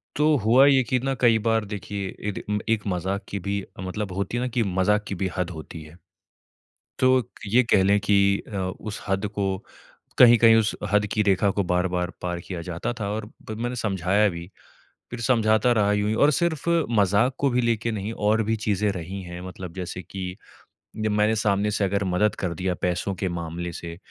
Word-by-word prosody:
तो 150 Hz, +1 st, +3 dB
हुआ 125 Hz, +5 st, +6 dB
ये 135 Hz, -2 st, +5 dB
कि 125 Hz, +2 st, 0 dB
ना 135 Hz, +2 st, -1 dB
कई 115 Hz, -2 st, +5 dB
बार 115 Hz, -1 st, +2 dB
देखिए 100 Hz, -1 st, -5 dB, 0.2 s
एद 100 Hz, -, -5 dB, 0.3 s
एक 115 Hz, -2 st, +1 dB
मज़ाक 95 Hz, +2 st, -2 dB
की 100 Hz, -, -3 dB
भी 100 Hz, +1 st, -3 dB, 0.2 s
मतलब 95 Hz, +2 st, -4 dB
होती 100 Hz, +5 st, -3 dB
है 120 Hz, -, -1 dB
ना -, -, -1 dB
कि 120 Hz, -, +3 dB
मज़ाक 100 Hz, +2 st, +1 dB
की 100 Hz, -, -3 dB
भी 95 Hz, +1 st, -1 dB
हद 90 Hz, -1 st, -1 dB
होती 80 Hz, -1 st, -8 dB
है। 75 Hz, +2 st, -15 dB, 1.0 s
तो 130 Hz, -3 st, +3 dB, 0.2 s
ये 120 Hz, +6 st, +4 dB
कह 95 Hz, -, +5 dB
लें 100 Hz, +2 st, +4 dB
कि 100 Hz, 0 st, +3 dB, 0.3 s
अ, -, -, -4 dB, 0.2 s
उस 110 Hz, -2 st, -6 dB
हद 95 Hz, +1 st, 0 dB
को, 100 Hz, -2 st, -3 dB, 0.5 s
कहीं-कहीं 115 Hz, -2 st, +7 dB
उस 110 Hz, -1 st, +2 dB, 0.2 s
हद 105 Hz, 0 st, +3 dB
की 105 Hz, -, +2 dB
रेखा 100 Hz, 0 st, +2 dB
को -, -, +4 dB
बार-बार 90 Hz, 0 st, 0 dB
पार 90 Hz, -1 st, -3 dB
किया 90 Hz, -3 st, -4 dB
जाता 85 Hz, +6 st, -3 dB
था 100 Hz, -, -2 dB
और 105 Hz, 0 st, -5 dB, 0.2 s
मैंने 120 Hz, +3 st, -3 dB
समझाया 100 Hz, -1 st, +1 dB
भी। 85 Hz, -1 st, -7 dB, 0.6 s
फिर 120 Hz, -, -6 dB
समझाता 110 Hz, -1 st, +3 dB
रहा 105 Hz, -3 st, +3 dB
यूँ 105 Hz, 0 st, 0 dB
ही 110 Hz, -, 0 dB
और 150 Hz, -, +4 dB
सिर्फ़ 170 Hz, 0 st, 0 dB, 0.3 s
मजाक 105 Hz, +6 st, +3 dB
को 140 Hz, -, +2 dB
भी 125 Hz, 0 st, +1 dB
लेके 115 Hz, -1 st, 0 dB
नहीं 105 Hz, 0 st, -4 dB, 0.2 s
और 110 Hz, +1 st, +3 dB
भी 110 Hz, +1 st, 0 dB
चीज़ें+ 105 Hz, 0 st, +1 dB
रही 95 Hz, +1 st, -6 dB
हैं 90 Hz, 0 st, -8 dB
मतलब 90 Hz, -1 st, -8 dB
जैसे 90 Hz, 0 st, -5 dB
कि 90 Hz, -1 st, -6 dB, 0.7 s
जब 110 Hz, -, +1 dB
मैंने 105 Hz, +1 st, +2 dB
सामने 105 Hz, -1 st, +1 dB
से 105 Hz, -1 st, 0 dB
अगर 100 Hz, +1 st, 0 dB
मदद 95 Hz, +3 st, +1 dB
कर 90 Hz, -3 st, -2 dB
दिया 90 Hz, +2 st, -2 dB
पैसों 90 Hz, +2 st, -1 dB
के 95 Hz, -, -1 dB
मामले 85 Hz, 0 st, -4 dB
से। 85 Hz, 0 st, -7 dB
100 Hz, 200 wpm, -24 LUFS, 95-110 Hz, 1.0 s, कहीं-कहीं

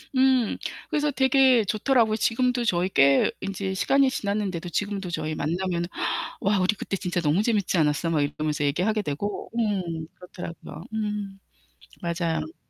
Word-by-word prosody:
음. 260 Hz, -3 st, +3 dB, 0.3 s
그래서 295 Hz, -1 st, +1 dB
되게 265 Hz, -3 st, +4 dB
좋더라고요. 220 Hz, +2 st, +2 dB
지금도 245 Hz, +2 st, +1 dB
저희 180 Hz, -4 st, +1 dB
꽤 140 Hz, -6 st, +4 dB
인제 195 Hz, 0 st, -3 dB
시간이 275 Hz, +8 st, +3 dB
지났는데도 200 Hz, -7 st, -2 dB
지금도 200 Hz, +1 st, -2 dB
저희 155 Hz, -2 st, -3 dB
만나면 170 Hz, +3 st, -1 dB, 0.6 s
"와, 200 Hz, 0 st, +2 dB
우리 185 Hz, +3 st, +2 dB
그때 195 Hz, -, -4 dB
진짜 180 Hz, -2 st, -2 dB
너무 160 Hz, +4 st, +2 dB
재밌지 210 Hz, -5 st, +1 dB
않았어?" 155 Hz, +1 st, +1 dB
막 160 Hz, -3 st, +1 dB
이러면서 150 Hz, +1 st, -1 dB
얘기하게 185 Hz, +10 st, +1 dB
되고. 200 Hz, +5 st, -4 dB
음. 185 Hz, -8 st, -1 dB
그렇더라고요. 175 Hz, -2 st, -9 dB
음. 210 Hz, -2 st, -3 dB, 0.6 s
맞아요. 170 Hz, -, -2 dB
195 Hz, 340 characters per minute, -25 LUFS, 170-220 Hz, 0.6 s, 되게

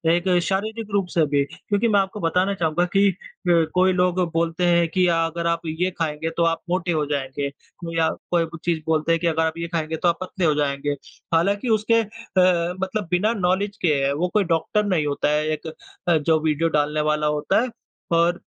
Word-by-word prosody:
एक 175 Hz, +2 st, -2 dB, 0.2 s
शारीरिक 215 Hz, +3 st, -2 dB
रूप 195 Hz, -2 st, +1 dB
से 165 Hz, -2 st, +3 dB
भी 145 Hz, -1 st, +1 dB
क्योंकि 205 Hz, +3 st, -1 dB
मैं 205 Hz, -2 st, +4 dB
आपको 195 Hz, +2 st, -2 dB
बताना 180 Hz, +3 st, +1 dB
चाहूँगा 170 Hz, -2 st, 0 dB
कि 200 Hz, +1 st, +5 dB
अ, 175 Hz, -2 st, 0 dB
कोई 185 Hz, +1 st, +3 dB
लोग 180 Hz, 0 st, +1 dB
बोलते 165 Hz, +1 st, 0 dB
हैं 170 Hz, -1 st, +3 dB
की 185 Hz, -1 st, +3 dB
अगर 165 Hz, +1 st, -1 dB
आप 170 Hz, 0 st, 0 dB, 0.2 s
ये 185 Hz, +1 st, +1 dB
खाएँगे 160 Hz, 0 st, -2 dB
तो 170 Hz, -, +3 dB
आप 165 Hz, -, -4 dB
मोटे 180 Hz, 0 st, 0 dB
हो 155 Hz, -3 st, 0 dB
जाएँगे। 140 Hz, 0 st, -3 dB, 0.3 s
कोई 165 Hz, -1 st, -6 dB
या 160 Hz, -1 st, +3 dB, 0.2 s
कोई 170 Hz, -1 st, +3 dB
कुछ 165 Hz, 0 st, -11 dB
चीज़ 170 Hz, -2 st, 0 dB
बोलते 160 Hz, +1 st, +1 dB
हैं 165 Hz, -, +3 dB
की 170 Hz, -, +1 dB
अगर 160 Hz, 0 st, +1 dB
आप 160 Hz, 0 st, -1 dB
यह 170 Hz, 0 st, -3 dB
खाएँगे 160 Hz, -1 st, -1 dB
तो 175 Hz, -, 0 dB
आप 170 Hz, -1 st, +2 dB
पतले 185 Hz, 0 st, -2 dB
हो 155 Hz, -, +4 dB
जाएँगे। 145 Hz, 0 st, -1 dB, 0.4 s
हालाँकि 200 Hz, +8 st, +1 dB
उसके 230 Hz, +2 st, +3 dB
अ, 185 Hz, -6 st, 0 dB
मतलब 190 Hz, 0 st, -2 dB
बिना 210 Hz, +6 st, +2 dB
नॉलेज 200 Hz, +3 st, 0 dB
के 165 Hz, -4 st, +3 dB
हैं 140 Hz, +1 st, +1 dB
वो 165 Hz, +5 st, 0 dB
कोई 210 Hz, -, +3 dB
डॉक्टर 210 Hz, +6 st, 0 dB
नहीं 180 Hz, -6 st, +1 dB
होता 145 Hz, 0 st, 0 dB
है 150 Hz, 0 st, +1 dB
एक 160 Hz, +1 st, -8 dB, 0.5 s
जो 160 Hz, -1 st, +3 dB
वीडियो 160 Hz, +1 st, +1 dB
डालने 150 Hz, +1 st, 0 dB
वाला 150 Hz, 0 st, 0 dB
होता 150 Hz, +9 st, +2 dB
है। 255 Hz, -, -2 dB, 0.4 s
और 170 Hz, +1 st, +3 dB
170 Hz, 210 wpm, -23 LUFS, 160-185 Hz, 0.5 s, कि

